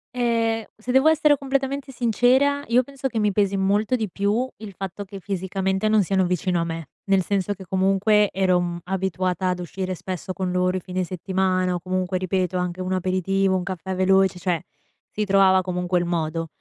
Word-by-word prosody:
Ehm, 230 -2 +1
se 225 +3 -4
devo 265 +4 +5
essere 300 -2 +4
completamente 275 0 -2
sincera, 255 +4 +2
io 240 +2 +4
penso 275 +1 -4
che 235 -4 -3
mi 210 -1 +2
pesi 200 0 +1
molto 205 +5 +1
di 220 -4 -2
più 205 +7 0
il 210 -3 -9
fatto 195 +2 -6
che 195 0 -9
fisicamente 190 +1 -1
non 215 -1 +4
siano 190 0 +1
vicino 180 0 0
a - - +1
me. 165 -2 -5 0.2
Nel 195 -1 +3
senso 200 +1 -1
che, 190 -1 -11
comunque, 195 +3 +3
ero, 185 -2 +2
mhmm, 175 -1 -3
abituata 185 0 -1
ad 180 - -1
uscire 185 +1 -4
spesso 185 +1 -5
con 185 -1 -2
loro 180 0 +1
i - - -2
fine 185 +1 -3
settimana, 185 0 0
o - - -2
comunque, 185 +1 -2
ripeto, 185 0 -1
anche 180 0 -3
un 185 +1 -2
aperitivo, 190 +1 +1
un 185 - -1
caffè 185 0 -4
veloce, 190 0 +3
cioè 175 -2 0 0.5
si 210 - -2
trovava 190 -1 +5
comunque 180 0 -1
il 175 - -1
modo. 165 -1 -2
190 Hz, 190 wpm, -23 LUFS, 185-210 Hz, 0.5 s, devo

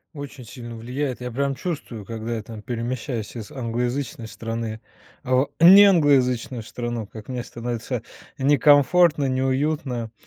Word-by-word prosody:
Очень 140 -3 -8
сильно 120 0 -9
влияет. 125 +3 -4
Я 125 0 -4
прям 140 +3 -1
чувствую, 130 - -5
когда 115 +2 -4
я 110 - -5
там 110 0 -9
перемещаюсь 120 0 -4
из 110 -3 -7
англоязычной 120 0 -3
страны 115 0 -5 0.4
в 130 +2 +2
неанглоязычную 145 - +6
страну, 120 0 -5
как 110 +3 -11
мне 125 -2 -3
становится 120 -1 -4 0.3
некомфортно, 145 +3 +4
неуютно, 130 -2 -1
125 Hz, 125 wpm, -23 LUFS, 115-140 Hz, 0.4 s, неанглоязычную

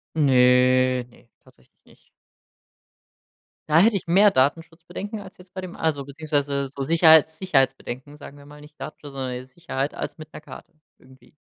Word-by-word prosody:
Ne, 130 -2 +3
ne, 120 0 -23
tatsächlich - - -26
nicht. - - -24 1.6
Da 155 +1 +4
hätte 210 +3 +4
ich - - -5
mehr 195 +5 +5
Datenschutzbedenken 165 - -2
als 190 -2 -13
jetzt 180 0 -18
bei 185 - -5
dem 185 -1 -9
also, 150 -4 -2
beziehungsweise, 140 -1 -2
so 140 +1 -7
Sicherheits 160 +1 +5
Sicherheitsbedenken, 135 -4 -2
sagen 145 -1 -12
wir 140 - -16
mal, 150 0 -14
nicht 150 +1 -17
Datenschutz, 150 -2 -9
sondern, 130 -2 -4
äh, 125 0 -6
Sicherheit 135 0 -5
als - - -6
mit 155 0 -12
'ner - - -9
Karte 170 +3 -13 0.3
irgendwie. 130 +1 -21
145 Hz, 160 wpm, -23 LUFS, 130-165 Hz, 1.6 s, mehr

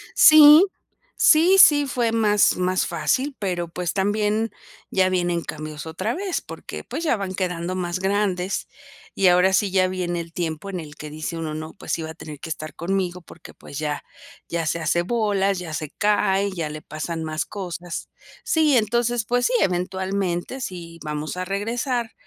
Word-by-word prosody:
Sí, 310 +2 +9 0.5
sí, 345 +5 +5
sí, 290 -5 +7
fue 240 -3 0
más 210 -4 +3
más 185 0 +1
fácil, 275 +2 0
pero, 180 -4 -2
pues, 175 0 -3
también 210 +3 0 0.4
ya 185 -1 +2
vienen 175 -2 0
cambios 155 0 -7
otra 185 +8 -3
vez, 380 -1 -2
porque, - - -8
pues 335 - -5
ya 310 - +2
van 195 -2 -4
quedando 180 -1 -2
más 180 0 -2
grandes. 190 -1 -1 0.5
Y 195 - +3
ahora 180 +1 +5
sí 195 0 +2
ya 185 -1 +3
viene 175 -2 -2
el 165 - -10
tiempo 170 +2 -4
en 185 - -4
el 150 -2 -9
que 150 - -8
dice 155 +2 -5
uno: 160 -2 -4
"No, 155 +1 -6
pues, - - -6
sí 165 - -1
va 160 0 -5
a - - -9
tener 150 -2 -9
que 160 - -8
estar 155 -1 -6
conmigo, 180 0 -2
porque, 165 0 -14
pues, 145 - -9
ya 150 -1 -3 0.5
ya 170 -1 -2
se 165 +2 -1
hace 165 +2 +1
bolas, 200 -2 0
ya 165 -3 -7
se 155 -1 -4
cae, 200 -1 +1
ya 165 -5 -3
le 155 0 -7
pasan 160 +2 -5
más 155 0 -2
cosas". 175 -3 -6 0.3
Sí, 310 -4 +3
entonces, 235 +1 +1
pues 245 +2 +1
sí, - - +1
eventualmente 190 +4 -1
sí 170 -5 -7
vamos 150 +2 -4
a 185 - -2
regresar 230 +4 -2
185 Hz, 180 wpm, -23 LUFS, 165-210 Hz, 0.5 s, Sí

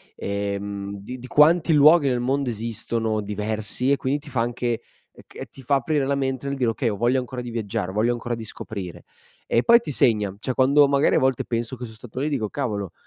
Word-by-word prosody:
ehm, 100 0 -4
di 125 +6 -8
di 125 - -9
quanti 160 +3 +4
luoghi 150 0 +6
nel 125 -2 +1
mondo 135 +2 0
esistono 115 0 -2
diversi 105 +5 -2
e 140 - +3
quindi 135 +3 -1
ti 150 - -12
fa 125 - -1
anche 120 0 -1 0.3
e - - -17
ch - - -9
ti 135 - -13
fa 140 +3 +1
aprire 140 +1 0
la 140 0 0
mente 135 0 -2
nel 140 - -2
dire: 125 -3 +1
"Okay, 120 +1 -2
ho 105 - -2
voglia 120 +4 +2
ancora 125 0 -5
di 120 -1 -7
viaggiare, 100 -5 -3
ho - - -11
voglia 115 +3 +2
ancora 120 0 -4
di 115 -1 -8
scoprire". 100 -5 -7 0.4
E 115 - +2
poi 235 0 +7
ti 150 - -5
segna. 105 -7 +2
Cioè, 130 +4 -3
quando 140 +3 +5
magari 140 +1 +3
a - - +4
volte 130 -2 +1
penso 115 +1 -3
che 125 - -9
son 110 - -11
stato 120 +2 -9
lì 150 - 0
dico: 110 -8 -2
"Cavolo, 105 - -3
120 Hz, 230 wpm, -23 LUFS, 110-135 Hz, 0.4 s, poi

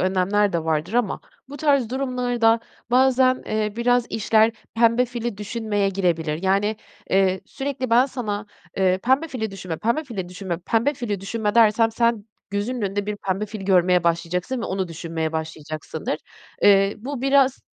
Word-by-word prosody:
önlemler 190 +2 +2
de 165 -2 -1
vardır 160 +4 -1
ama 240 -5 0 0.3
bu 285 - -8
tarz 280 -5 +2
durumlarda 245 -3 +1 0.3
bazen, 255 0 +4
eee, 215 -1 -1
biraz 245 0 +2
işler 220 +1 +3 0.2
pembe 230 +2 +4
fili 240 -3 -4
düşünmeye 210 -1 -1
girebilir. 170 -4 -1
Yani, 200 +3 +1 0.3
eee, 190 -1 +3
sürekli 270 -3 -4
ben 245 +3 +5
sana, 215 -6 -4 0.3
eee, 185 -1 +2
"Pembe 270 +6 +2
fili 220 -6 -3
düşünme. 185 -4 -6
Pembe 235 - 0
fili 195 -9 -5
düşünme. 180 -2 -5
Pembe 230 +10 0
fili 215 -7 -3
düşünme." 210 +2 -2
dersem 225 0 +5
sen 230 -2 +1 0.3
gözünün 215 +4 -2
önünde 200 +1 -2
bir 210 0 -3
pembe 195 +2 -2
fili 210 -1 -7
görmeye 180 -2 +3
başlayacaksın 170 +8 -1
ve - - -3
onu 190 -1 -2
düşünmeye 165 -1 -4
başlayacaksındır. 155 -1 -4 0.4
Eee, 195 0 +5
bu 260 +2 -6
biraz 270 -1 +3
210 Hz, 155 wpm, -23 LUFS, 185-245 Hz, 0.4 s, ben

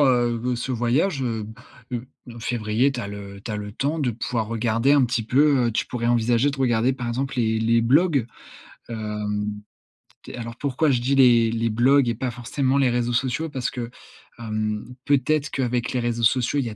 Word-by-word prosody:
heu, 120 -2 +2
ce 130 +2 -3
voyage, 130 +7 +1
heu. 115 -4 -2 0.5
Heu, 125 +1 -3 0.3
février, 115 +3 +1
tu 135 - -6
as 110 - -4
le 100 -1 -8
tu 110 - -7
as 105 - -2
le 105 0 -6
temps 145 +8 -1
de 130 -4 +1
pouvoir 115 -1 -3
regarder 115 +3 +1
un 145 -2 +5
petit 120 -1 -1
peu. 135 +2 +3
Heu, - - +1
tu - - -1
pourrais 120 -2 -3
envisager 120 +3 +2
de 140 - -6
regarder, 125 -1 +2
par 125 -2 -5
exemple, 130 +3 -2
les 110 -2 +1
les 115 +1 +3
blogs. 140 +1 +3 0.6
Hem, 105 -2 -3 0.7
tu - - -10
es - - -8
alors, 115 0 -6
pourquoi 140 +3 0
je 125 -2 +1
dis 135 +3 +1
les 120 -4 +5
les 115 0 0
blogs 125 +4 +4
et 115 - 0
pas 125 +1 -3
forcément 130 +3 -1
les 135 -2 +3
réseaux 120 0 0
sociaux? 130 +7 -1
Parce 130 -4 -2
que, 120 -3 -5 0.5
hem, 110 -2 -3 0.2
peut-être 145 +1 +1
qu'avec 125 -2 -1
les 125 - -1
réseaux 120 -1 -2
sociaux, 125 +4 +2
il 130 - -1
y - - -3
a 110 - -8
120 Hz, 205 wpm, -23 LUFS, 115-130 Hz, 0.7 s, un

